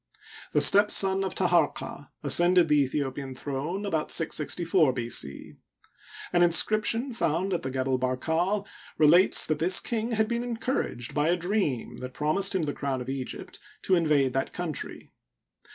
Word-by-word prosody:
— -, -, -16 dB
The -, -, +3 dB
step 205 Hz, +1 st, +6 dB
son 195 Hz, 0 st, +2 dB
of 190 Hz, -, -4 dB
Taharqa 170 Hz, -5 st, -1 dB
ascended 175 Hz, +4 st, +4 dB
the 150 Hz, -1 st, +4 dB
Aethi 140 Hz, +2 st, -2 dB
opian 135 Hz, -1 st, -8 dB
throne 150 Hz, +10 st, -4 dB
about 160 Hz, -6 st, -2 dB
664 165 Hz, -1 st, +1 dB
B. 120 Hz, -2 st, -5 dB
C. 70 Hz, -1 st, -3 dB, 0.8 s
An 175 Hz, -, +3 dB
inscription 215 Hz, +8 st, +2 dB
found 185 Hz, -2 st, -1 dB
at 175 Hz, -, -2 dB
the 130 Hz, -, -5 dB
Gebel 130 Hz, 0 st, -2 dB
Barkal 160 Hz, +11 st, -1 dB, 0.3 s
relates 165 Hz, +5 st, +5 dB
that 155 Hz, -1 st, -2 dB
this 180 Hz, +4 st, +4 dB
king 230 Hz, 0 st, -3 dB
had 220 Hz, -1 st, +1 dB
been 235 Hz, +1 st, -2 dB
encouraged, 230 Hz, -, -3 dB
by 150 Hz, +1 st, 0 dB
a 175 Hz, -, +1 dB
dream 175 Hz, -, -2 dB
that 130 Hz, 0 st, -9 dB
promised 190 Hz, +7 st, 0 dB
him 185 Hz, -, 0 dB
the 145 Hz, -2 st, -3 dB
crown 135 Hz, -2 st, -3 dB
of 125 Hz, +1 st, -7 dB
Egypt, 135 Hz, -2 st, -6 dB, 0.2 s
to 190 Hz, -, 0 dB
in 170 Hz, -3 st, +2 dB
vade 140 Hz, -4 st, +2 dB
that 135 Hz, -, -3 dB
country. 175 Hz, -4 st, -5 dB
165 Hz, 170 wpm, -26 LUFS, 140-190 Hz, 0.8 s, step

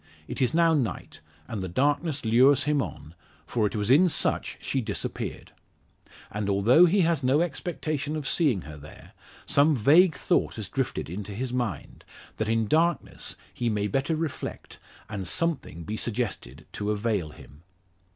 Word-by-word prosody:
It -, -, -5 dB
is 130 Hz, +4 st, +1 dB
now 165 Hz, -1 st, +4 dB
night, 125 Hz, -, -3 dB, 0.3 s
and 105 Hz, -4 st, -4 dB
the 95 Hz, -, -3 dB
darkness 145 Hz, -, 0 dB
lures 125 Hz, +5 st, +5 dB
him 150 Hz, -1 st, +1 dB
on; 80 Hz, -, -7 dB, 0.3 s
for 110 Hz, -3 st, 0 dB
it -, -, -6 dB
was 105 Hz, +2 st, 0 dB
in 175 Hz, +7 st, +6 dB
such -, -, -1 dB
she 135 Hz, -, -1 dB
disappeared. 105 Hz, -3 st, -4 dB, 0.8 s
And 105 Hz, -1 st, -3 dB
although 115 Hz, -, +5 dB
he 195 Hz, +4 st, +3 dB
has 165 Hz, -4 st, +2 dB
no 135 Hz, +4 st, +3 dB
expectation 155 Hz, -3 st, -3 dB
of 150 Hz, -3 st, -3 dB
seeing 140 Hz, -, +2 dB
her 75 Hz, -2 st, -10 dB
there, 75 Hz, +1 st, -13 dB, 0.3 s
some 145 Hz, +2 st, +4 dB
vague 155 Hz, -, +5 dB
thought -, -, 0 dB
has -, -, -6 dB
drifted -, -, -2 dB
into 100 Hz, +5 st, -6 dB
his 125 Hz, +2 st, -3 dB
mind, 120 Hz, -, -4 dB, 0.3 s
that 110 Hz, 0 st, -1 dB
in 115 Hz, 0 st, +2 dB
darkness 165 Hz, +5 st, 0 dB, 0.2 s
he 120 Hz, -, -1 dB
may 105 Hz, -2 st, -1 dB
better 135 Hz, -, 0 dB
reflect, 155 Hz, -3 st, -5 dB, 0.3 s
and 100 Hz, -4 st, -5 dB
something 150 Hz, -, -1 dB
be 105 Hz, +7 st, -4 dB
suggested 105 Hz, -, -3 dB
to 105 Hz, 0 st, -4 dB
avail 105 Hz, -5 st, -1 dB
him. 75 Hz, 0 st, -15 dB
125 Hz, 160 wpm, -26 LUFS, 105-155 Hz, 0.8 s, in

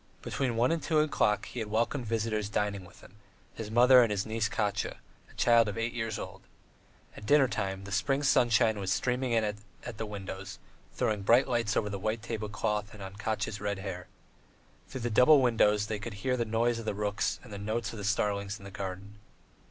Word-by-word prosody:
Between 130 Hz, -4 st, -1 dB
one 120 Hz, +5 st, +3 dB
and 165 Hz, -1 st, 0 dB
two 160 Hz, -, 0 dB
o'clock 150 Hz, -8 st, +1 dB
he 125 Hz, -, -7 dB
had 110 Hz, -2 st, -4 dB
welcome 115 Hz, +5 st, 0 dB
visitors 110 Hz, -2 st, -1 dB
dining 100 Hz, -2 st, -1 dB
with -, -, -17 dB
him -, -, -17 dB, 0.4 s
his 110 Hz, -2 st, -6 dB
mother 125 Hz, +3 st, +7 dB
and 115 Hz, -, +3 dB
his 100 Hz, -1 st, -1 dB
niece 110 Hz, -1 st, -1 dB
Katya, 105 Hz, -1 st, -1 dB, 0.3 s
a -, -, -18 dB
child 115 Hz, -2 st, +4 dB
of 105 Hz, -, -4 dB
eight 115 Hz, +1 st, -2 dB
years 115 Hz, -2 st, -3 dB
old. -, -, -8 dB, 0.7 s
All -, -, -11 dB
dinner 140 Hz, +4 st, +5 dB
time 95 Hz, -3 st, -3 dB
the 100 Hz, -, -9 dB
spring 135 Hz, +8 st, 0 dB
sunshine 115 Hz, -5 st, +3 dB
was 95 Hz, -1 st, -2 dB
streaming 125 Hz, +5 st, 0 dB
in 115 Hz, -1 st, +3 dB
at 105 Hz, 0 st, -3 dB, 0.4 s
the 110 Hz, -, -3 dB
windows, 95 Hz, -1 st, -7 dB, 0.3 s
throwing 105 Hz, -2 st, -1 dB
bright 120 Hz, +6 st, +4 dB
light 115 Hz, -4 st, 0 dB
on 105 Hz, -2 st, 0 dB
the 100 Hz, -, -4 dB
white 110 Hz, +2 st, -2 dB
tablecloth 105 Hz, -2 st, -3 dB
and 100 Hz, -, -9 dB
on 95 Hz, +1 st, -9 dB
Katya's 105 Hz, -1 st, -3 dB
red 100 Hz, -1 st, -2 dB
hair. 95 Hz, -2 st, -6 dB, 0.8 s
Through 130 Hz, -, -7 dB
the 120 Hz, 0 st, -2 dB
double 135 Hz, +7 st, +7 dB
windows 105 Hz, -4 st, +3 dB
they 105 Hz, -1 st, -3 dB
could 110 Hz, 0 st, -6 dB
hear 125 Hz, +5 st, -1 dB
the 120 Hz, -2 st, -1 dB
noise 115 Hz, +1 st, +1 dB
of 115 Hz, -, -7 dB
the 105 Hz, -, -2 dB
rooks 105 Hz, +1 st, -1 dB
and 120 Hz, -, -11 dB
the 100 Hz, -, -6 dB
notes 110 Hz, +2 st, -2 dB
of -, -, -7 dB
the -, -, -6 dB
starlings 100 Hz, 0 st, -1 dB
in 100 Hz, -, -14 dB
the 100 Hz, -, -9 dB
garden. 95 Hz, +2 st, -7 dB
110 Hz, 210 wpm, -30 LUFS, 100-120 Hz, 0.8 s, mother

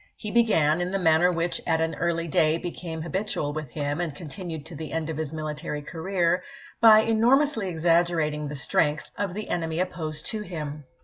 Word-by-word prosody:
He 210 Hz, -, -6 dB
began, 175 Hz, -9 st, +3 dB
in 175 Hz, -, -1 dB
the 195 Hz, -, 0 dB
manner 175 Hz, 0 st, +4 dB
which 170 Hz, 0 st, -1 dB
at 165 Hz, -1 st, +2 dB
an 160 Hz, 0 st, 0 dB
early 170 Hz, -1 st, -1 dB
day 155 Hz, +1 st, +3 dB
became 165 Hz, -2 st, -5 dB
habitual 170 Hz, -4 st, -2 dB
with 155 Hz, -3 st, -5 dB
him 145 Hz, +3 st, -2 dB
and 160 Hz, -5 st, -3 dB
continued 160 Hz, -1 st, -6 dB
to 165 Hz, -, -8 dB
the 155 Hz, +1 st, -6 dB
end 160 Hz, 0 st, -2 dB
of 155 Hz, -, -5 dB
his 155 Hz, -2 st, -3 dB
military 155 Hz, -1 st, -4 dB
career, 175 Hz, +2 st, 0 dB, 0.4 s
by 220 Hz, -2 st, +8 dB
enormously 230 Hz, 0 st, +3 dB
exaggerating 165 Hz, -3 st, +1 dB
the 150 Hz, -, -5 dB
strength 150 Hz, +2 st, 0 dB
of 200 Hz, -3 st, -3 dB
the 215 Hz, 0 st, -5 dB
enemy 165 Hz, -1 st, -1 dB
opposed 155 Hz, -4 st, -3 dB
to 220 Hz, -, -3 dB
him. 150 Hz, -6 st, -6 dB
165 Hz, 185 wpm, -26 LUFS, 155-180 Hz, 0.4 s, by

